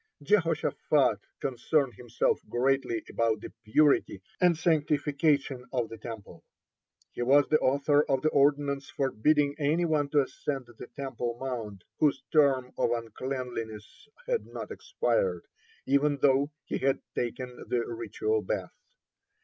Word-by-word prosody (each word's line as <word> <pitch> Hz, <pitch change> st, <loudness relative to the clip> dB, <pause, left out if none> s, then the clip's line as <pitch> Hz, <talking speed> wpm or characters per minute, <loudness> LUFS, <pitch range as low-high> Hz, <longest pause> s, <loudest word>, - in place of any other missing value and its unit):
(28) 145 Hz, -, -17 dB
Jehoshaphat 160 Hz, -, +2 dB, 0.2 s
concerned 135 Hz, +1 st, 0 dB
himself 120 Hz, -1 st, 0 dB
greatly 125 Hz, -1 st, 0 dB
about 115 Hz, -2 st, 0 dB
the -, -, -9 dB
purity 140 Hz, -2 st, +3 dB, 0.2 s
and 175 Hz, -2 st, +4 dB
sanctification 145 Hz, -4 st, +1 dB
of 120 Hz, -4 st, -1 dB
the 115 Hz, -, -8 dB
Temple. 110 Hz, -2 st, -9 dB, 0.7 s
He -, -, -6 dB
was 140 Hz, +3 st, +5 dB
the 155 Hz, -, +4 dB
author 140 Hz, +2 st, +3 dB
of 135 Hz, -1 st, +1 dB
the 155 Hz, -, +4 dB
ordinance 140 Hz, -1 st, +2 dB
forbidding 140 Hz, +3 st, +1 dB
any 155 Hz, +4 st, +2 dB
one 150 Hz, -3 st, +1 dB
to 145 Hz, 0 st, +4 dB
ascend 135 Hz, -1 st, -4 dB
the 120 Hz, -, -9 dB
Temple 125 Hz, -4 st, -4 dB
mount 115 Hz, -7 st, -5 dB, 0.2 s
whose 150 Hz, -2 st, +2 dB
term 135 Hz, -4 st, +3 dB
of -, -, +2 dB
uncleanness 115 Hz, -, -5 dB, 0.2 s
had 485 Hz, -2 st, -1 dB
not -, -, -7 dB
expired, -, -, -1 dB, 0.4 s
even 140 Hz, +1 st, +2 dB
though 140 Hz, +1 st, +3 dB, 0.2 s
he -, -, -3 dB
had 135 Hz, 0 st, +1 dB
taken 125 Hz, +1 st, -4 dB
the 120 Hz, -1 st, 0 dB
ritual 420 Hz, -, -2 dB
bath. -, -, -3 dB
135 Hz, 135 wpm, -29 LUFS, 120-150 Hz, 0.7 s, was